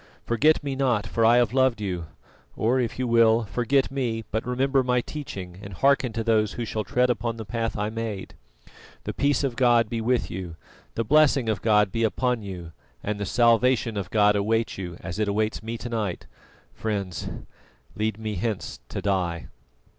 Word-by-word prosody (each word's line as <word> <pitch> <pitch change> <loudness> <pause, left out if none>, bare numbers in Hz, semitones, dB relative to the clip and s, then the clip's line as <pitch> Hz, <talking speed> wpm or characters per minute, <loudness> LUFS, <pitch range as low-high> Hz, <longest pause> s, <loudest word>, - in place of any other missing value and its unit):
Forget 150 +7 +3
me 140 -2 -2
not, 125 -6 +1
for 115 +3 -1
I 115 +2 +6
have 120 -2 +2
loved 130 -3 +3
you; 90 -5 -3 0.5
or 120 +4 +1
if 120 -3 -2
you 130 - -1
will, 115 -1 +4
forget 125 +6 +1
me, 120 -5 -2
but 110 +2 -2
remember 135 +2 +2
my 125 0 +2
teaching 95 -11 -7
and 100 -2 -8
hearken 135 +1 +3
to 115 0 -2
those 110 -2 +2
who 120 - -3
shall 110 -1 -3
tread 125 +6 +2
upon 115 -1 -2
the 110 - -6
path 115 +1 -2
I 105 +1 -1
made. 110 -4 -5 0.7
The - - -4
peace 145 +1 +1
of 130 -4 -1
God 120 -3 +4
be 115 0 -2
with 125 +2 0
you, 90 -3 -6 0.4
the 115 - 0
blessing 140 -1 +4
of 105 -5 -1
God 105 -2 +3
be 115 - -2
upon 125 +1 0
you, 90 -5 -7 0.3
and 105 0 -2
the 100 - -3
salvation 120 -1 +3
of 95 -3 -3
God 105 -1 +4
await 110 +3 0
you, 90 -3 -6
as 95 +2 -5
it 105 - +1
awaits 105 +1 0
me 115 +1 -5
to 120 - -6
night! 110 -6 -3 0.5
Friends, 100 -6 -3 0.7
lead 110 0 -1
me 110 -1 -4
hence 110 0 -3
to - - -5
die." 90 -4 -1
115 Hz, 190 wpm, -25 LUFS, 105-125 Hz, 0.7 s, I